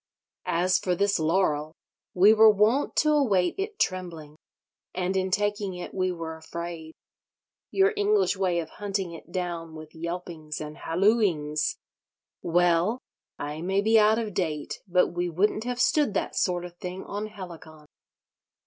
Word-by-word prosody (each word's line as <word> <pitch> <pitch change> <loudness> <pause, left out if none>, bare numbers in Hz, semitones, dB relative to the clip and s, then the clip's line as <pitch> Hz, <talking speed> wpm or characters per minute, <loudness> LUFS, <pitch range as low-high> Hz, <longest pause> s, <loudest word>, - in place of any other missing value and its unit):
As 180 +2 +2
for 180 -1 0
this 200 +1 +1
laurel, 155 -2 +1 0.4
we 195 +4 +7
were 220 0 +7
wont 215 +7 +2
to 305 - +3
await 205 -12 +2
it 410 +1 -3
trembling: 170 -5 -3 0.6
and 185 +1 -1
in 190 0 0
taking 205 -1 -1
it 180 - -7
we 185 -1 0
were 165 -2 -6
afraid. 165 0 -7 0.8
Your 390 +2 +3
English 415 - +2
way 185 -3 0
of 165 - -4
hunting 195 -3 -3
it 165 +1 -12
down 170 -3 -4
with 155 0 -11
yelpings 165 -2 -6
and 150 0 -7
hallooings—well, 175 0 0 0.4
I 150 +2 -5
may 190 +3 +1
be 220 +2 +5
out 215 +1 +4
of 220 -3 -3
date, 155 -5 -3
but 180 0 +3
we 175 +1 -2
wouldn't 210 +6 0
have 245 0 -3
stood 275 -3 +2
that - - -1
sort 180 -1 0
of 175 -1 -10
thing 180 +1 -6
on 205 +1 -5
Helicon." 170 -7 -11
180 Hz, 150 wpm, -26 LUFS, 165-210 Hz, 0.8 s, we